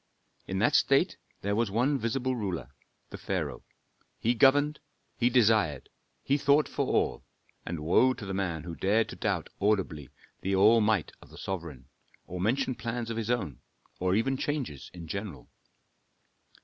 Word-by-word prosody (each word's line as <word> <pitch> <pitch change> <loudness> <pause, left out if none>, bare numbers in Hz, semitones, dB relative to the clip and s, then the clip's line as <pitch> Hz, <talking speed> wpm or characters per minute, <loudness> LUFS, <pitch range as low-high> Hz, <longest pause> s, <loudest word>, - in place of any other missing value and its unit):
In - - -2
that - - +3
state - - +3 0.2
there 100 +1 0
was 115 -1 +1
one 130 +7 +1
visible 130 +2 -1
ruler, 100 -7 -4 0.4
the - - -7
pharaoh. - - -3 0.5
He 120 - +1
governed, 145 +4 +4 0.4
he 120 0 +2
desired, 110 - +3 0.3
he 140 +2 +1
thought 145 +2 +4
for - - -2
all, - - 0 0.4
and 85 -3 -4
woe 125 +11 +4
to 105 - -8
the 95 - -4
man 90 -5 -2
who 85 0 -6
dared 105 +6 +1
to - - -7
doubt - - -1
audibly 95 - 0 0.3
the 95 +1 0
all 110 +4 +6
might 105 -6 +1
of - - -16
the - - -14
sovereign, 85 -9 -5 0.4
or 90 0 -6
mention 130 +6 +1
plans 115 -1 -4
of 115 - -4
his 115 0 -3
own, 100 - -2 0.4
or 90 +1 +1
even 130 +5 +1
changes 130 - -3
in 85 -2 -10
general. 100 +3 -6
110 Hz, 160 wpm, -29 LUFS, 90-125 Hz, 0.5 s, all